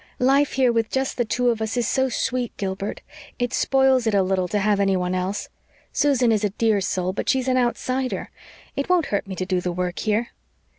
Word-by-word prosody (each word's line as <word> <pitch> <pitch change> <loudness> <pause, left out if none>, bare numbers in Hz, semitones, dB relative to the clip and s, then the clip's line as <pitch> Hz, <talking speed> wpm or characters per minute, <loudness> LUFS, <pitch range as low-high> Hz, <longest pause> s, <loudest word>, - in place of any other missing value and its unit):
"Life 275 +3 +3
here 255 -3 +3
with 225 -1 0
just 265 0 -1
the 240 - +1
two 245 +2 +1
of 225 -1 -4
us 220 +2 -2
is 240 -3 +1
so 265 0 +1
sweet, 250 -1 -2
Gilbert. 195 +1 -4 0.4
It 245 -1 -2
spoils 265 -3 +3
it 215 - +2
a 195 - +4
little 185 -1 0
to 210 - -1
have 205 0 +2
anyone 185 -2 +1
else. 185 +2 -2 0.4
Susan 265 -5 +3
is 215 -1 +1
a 210 - +2
dear 215 0 +1
soul, 185 0 -1
but - - -3
she - - +4
is 260 0 -2
an 255 - +2
outsider. 255 +1 -1 0.4
It 280 - -2
won't 360 -3 +3
hurt 200 - 0
me 190 - -5
to 185 - -3
do 185 -1 0
the 180 - -2
work 180 0 -3
here." 220 +2 0
225 Hz, 225 wpm, -23 LUFS, 195-255 Hz, 0.4 s, a